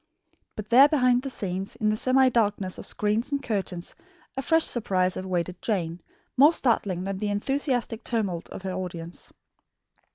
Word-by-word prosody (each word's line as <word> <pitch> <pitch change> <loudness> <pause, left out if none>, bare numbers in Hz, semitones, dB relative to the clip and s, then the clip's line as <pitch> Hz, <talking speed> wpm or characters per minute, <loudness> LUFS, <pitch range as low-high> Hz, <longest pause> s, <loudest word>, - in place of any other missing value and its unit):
But 215 -1 -7
there, 260 +4 +8
behind 250 -5 +3
the 270 - -5
scenes, 195 -5 -4
in 215 - 0
the 215 - +2
semi 260 +4 +3
darkness 205 -5 0
of - - -6
screens 210 +5 0
and 280 -1 -1
curtains, 195 -6 -3 0.4
a 270 - -2
fresh 325 +3 +3
surprise 185 -5 0
awaited 180 -1 -3
Jane, 175 -5 -2 0.3
more 290 +5 +7
startling 200 - 0
than 195 0 -3
the 210 0 -1
enthusiastic 245 +1 -1
tumult 200 -8 -2
of - - -9
her 190 -1 -3
audience. 175 -2 -6
210 Hz, 160 wpm, -26 LUFS, 185-250 Hz, 0.4 s, there